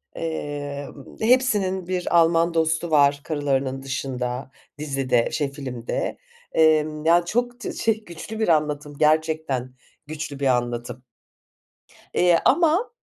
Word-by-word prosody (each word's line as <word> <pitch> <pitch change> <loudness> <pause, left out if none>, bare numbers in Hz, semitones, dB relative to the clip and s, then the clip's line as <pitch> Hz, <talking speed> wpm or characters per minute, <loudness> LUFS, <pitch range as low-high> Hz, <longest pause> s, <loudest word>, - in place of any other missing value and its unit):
eee, 145 -3 -4
ımm, 140 - -14
hepsinin 210 -7 +2
bir 180 -2 0
Alman 165 +1 +3
dostu 160 +1 0
var 145 -1 +4
karılarının 135 -3 -1
dışında 130 -1 -4 0.3
dizide 135 -5 0
şey 145 -3 -1
filmde. 130 -4 -4 0.3
Emm, 155 -1 +2
yani, 170 +1 +4
çok 245 +6 -1
tı - - -5
şey, 225 -1 0
güçlü 175 +6 -8
bir 220 - +1
anlatım 150 -2 0
gerçekten 155 -5 +1 0.3
güçlü 150 -2 -6
bir 140 - +1
anlatım. 120 0 -1 1.1
Eee, 175 -2 +4
ama 340 - +3
155 Hz, 120 wpm, -23 LUFS, 135-170 Hz, 1.1 s, var